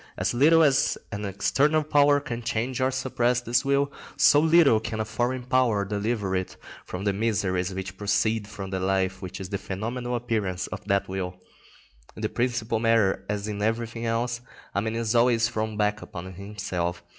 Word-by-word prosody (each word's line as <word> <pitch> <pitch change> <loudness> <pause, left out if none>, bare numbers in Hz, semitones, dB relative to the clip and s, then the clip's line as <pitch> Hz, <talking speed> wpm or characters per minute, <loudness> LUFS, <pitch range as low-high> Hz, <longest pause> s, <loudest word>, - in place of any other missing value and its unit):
As - - 0
little 160 +6 +5
as 140 -3 +3
an 105 -1 -4
external 145 +10 +2
power 145 -1 +4
can 120 -5 -5
change 120 +2 -2
or 130 - +3
suppress 125 -2 0
this 120 +1 +1
will, 140 +1 +1 0.3
so 135 +2 +6
little 160 -7 +5
can 110 0 -5
a 110 - 0
foreign 125 +3 -1
power 125 -5 +2
deliver 105 -1 -1
it 95 0 -3 0.3
from 90 +2 -5
the 100 -1 +1
miseries 95 -4 0
which 95 0 -6
proceed 105 +1 0
from 95 -3 -7
the 95 - -1
life 95 0 0
which 90 -2 -7
is 95 -1 -6
the 100 -1 -3
phenomenal 120 +5 -4
appearance 110 -6 -1
of - - -7
that 100 -1 +1
will. 95 -1 -4 0.8
In - - -8
the - - +1
principal 120 -2 -1
matter, 110 -4 +2
as 105 0 -2
in 105 -1 -4
everything 115 +1 -1
else, 115 +1 -1 0.3
a 100 - +1
man 110 +1 -2
is 115 -1 -1
always 120 -1 +4
thrown 110 -2 -3
back 105 0 +1
upon 95 +1 -8
himself. 90 -3 -4
110 Hz, 180 wpm, -26 LUFS, 100-125 Hz, 0.8 s, so